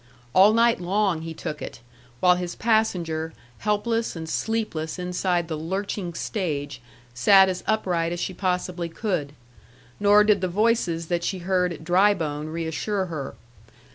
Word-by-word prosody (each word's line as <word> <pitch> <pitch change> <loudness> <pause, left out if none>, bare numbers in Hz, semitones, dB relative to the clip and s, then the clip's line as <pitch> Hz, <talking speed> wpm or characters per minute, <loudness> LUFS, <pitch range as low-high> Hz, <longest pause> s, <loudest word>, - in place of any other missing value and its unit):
All 195 +6 +7
night 230 -3 +3
long 190 -2 +1
he 165 0 -6
took 155 -2 -5
it, - - -7 0.4
while 180 0 +6
his 180 -1 -4
passenger, 175 -8 0 0.3
helpless 225 +2 0
and 160 -1 -6
sleepless 170 -5 -2
inside 180 -1 -1
the 160 - -3
lurching 180 +2 -4
stage, 145 - -3 0.3
sat 190 +10 +6
as 185 -1 -3
upright 180 -6 0
as 175 - -3
she 185 - -3
possibly 180 -2 -2
could; 165 -6 -2 0.7
nor 205 +1 +6
did 210 -2 +3
the 185 - +1
voices 185 -4 +1
that 175 -1 0
she 190 - -1
heard 180 0 0
at 160 - -8
Drybone 170 -4 +2
reassure 165 +5 -2
her. 140 -3 -5
180 Hz, 145 wpm, -24 LUFS, 165-205 Hz, 0.7 s, All